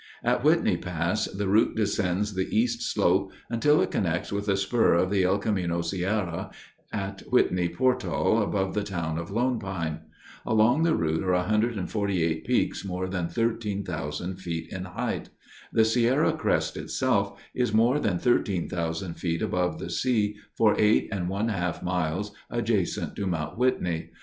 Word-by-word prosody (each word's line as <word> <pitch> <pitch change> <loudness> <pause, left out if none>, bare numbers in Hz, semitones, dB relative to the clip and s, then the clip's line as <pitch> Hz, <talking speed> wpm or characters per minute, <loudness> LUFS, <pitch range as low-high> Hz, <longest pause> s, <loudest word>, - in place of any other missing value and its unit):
At - - +1
Whitney - - +3
Pass 90 +4 -1
the 100 +1 -3
route 105 +4 +3
descends 105 -1 0
the 95 0 -1
east 240 +1 +1
slope 95 - +1 0.2
until 150 +6 +4
it - - -3
connects 85 -1 -1
with 100 +1 -2
a 100 - +3
spur 100 +1 +3
of 90 +2 +2
the 100 -2 +3
El 95 +2 +3
Camino 90 -5 -1
Sierra 95 +1 -2 0.4
at 100 -1 -4
Whitney 90 -8 +3
Portal 125 -2 +1
above 95 -2 -1
the 105 - 0
town 85 -5 -3
of 85 - -6
Lone 120 +3 0
Pine. 85 -5 -3 0.4
Along 110 +7 +3
the 165 -1 +3
route 80 +2 0
are 95 -1 +1
148 100 -4 0
peaks - - +1
more 95 -1 -3
than 90 -2 -2
13,000 95 -8 -2
feet 85 -3 -5
in 95 0 -4
height. 90 - -3 0.4
The 110 - +4
Sierra 120 +6 +3
crest, - - 0
itself, - - 0
is 125 -3 0
more 115 +6 +3
than 100 -10 0
13,000 85 -5 0
feet 85 -1 -2
above 90 0 0
the 85 - -6
sea 105 +2 +1 0.2
for 110 -2 +5
eight 105 0 +4
and 90 -4 -2
one 100 +4 -1
half 90 -5 -2
miles 90 +3 -1 0.2
adjacent 115 -6 -1
to 100 - -2
Mount 80 -4 -2
Whitney. 85 -10 0
95 Hz, 155 wpm, -27 LUFS, 90-110 Hz, 0.4 s, for